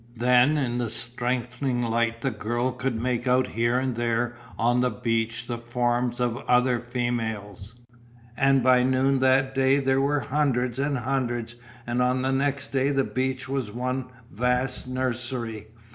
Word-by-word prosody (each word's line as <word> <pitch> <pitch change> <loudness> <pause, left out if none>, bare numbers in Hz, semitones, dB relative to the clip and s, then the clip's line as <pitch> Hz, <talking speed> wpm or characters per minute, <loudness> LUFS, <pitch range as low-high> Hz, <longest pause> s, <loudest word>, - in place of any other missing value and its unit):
Then 125 +5 +4
in 125 -4 -1
the 120 -2 -1
strengthening 125 +2 -1
light 115 0 0
the 135 - 0
girl 120 +3 -1
could 125 -2 -3
make 125 +1 -1
out 125 +1 +3
here 120 +2 0
and 130 0 0
there 120 +1 -1 0.2
on 120 +2 +2
the 125 - +2
beach 115 0 -2
the 120 -1 -4
forms 120 +1 -1
of 120 -1 0
other 125 0 +3
females, 115 -4 -4 0.6
and 135 0 +3
by 130 0 +5
noon 130 +1 +2
that 130 +1 +3
day 135 +1 +3
there 135 -1 +2
were 145 +1 +1
hundreds 125 -2 0
and 140 0 0
hundreds, 120 -2 -2 0.3
and 120 +1 -1
on 125 +1 +1
the 130 - +1
next 140 +1 -1
day 135 0 +1
the 135 -1 +2
beach 130 +1 -2
was 135 -4 -2
one 125 +2 -3 0.2
vast 125 +3 0
nursery. 120 -3 -2
125 Hz, 160 wpm, -25 LUFS, 120-130 Hz, 0.6 s, by